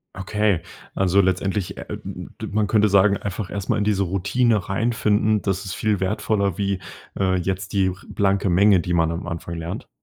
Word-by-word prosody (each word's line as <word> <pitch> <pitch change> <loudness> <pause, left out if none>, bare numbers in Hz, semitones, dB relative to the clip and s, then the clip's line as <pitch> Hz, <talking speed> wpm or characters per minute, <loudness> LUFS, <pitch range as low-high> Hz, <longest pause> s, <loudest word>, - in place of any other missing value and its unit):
Okay, 100 -1 0 0.3
also 95 +1 +3
letztendlich, 95 +1 -1
äh - - -6
äh, - - -7
m - - -4
m - - -7
d - - -4
man 105 0 +1
könnte 105 0 +3
sagen, 100 0 +4
einfach 100 -1 -5
erst 100 -1 -5
mal 120 - +2
in - - +1
diese 100 -2 +1
Routine 100 +3 +1
reinfinden. 110 0 +1
Das 95 0 -2
ist 95 - -4
viel 105 -3 0
wertvoller 100 0 0
wie, 100 -2 -1 0.4
äh, 95 -1 +2
jetzt 95 +2 -3
die 95 -2 +3
r 90 - -2
blanke 100 0 +1
Menge, 100 +2 +5
die 90 +1 -2
man 80 -1 +2
am 85 +3 -4
Anfang 85 0 -5
lernt. 85 +1 -5
100 Hz, 205 wpm, -22 LUFS, 95-105 Hz, 0.4 s, Menge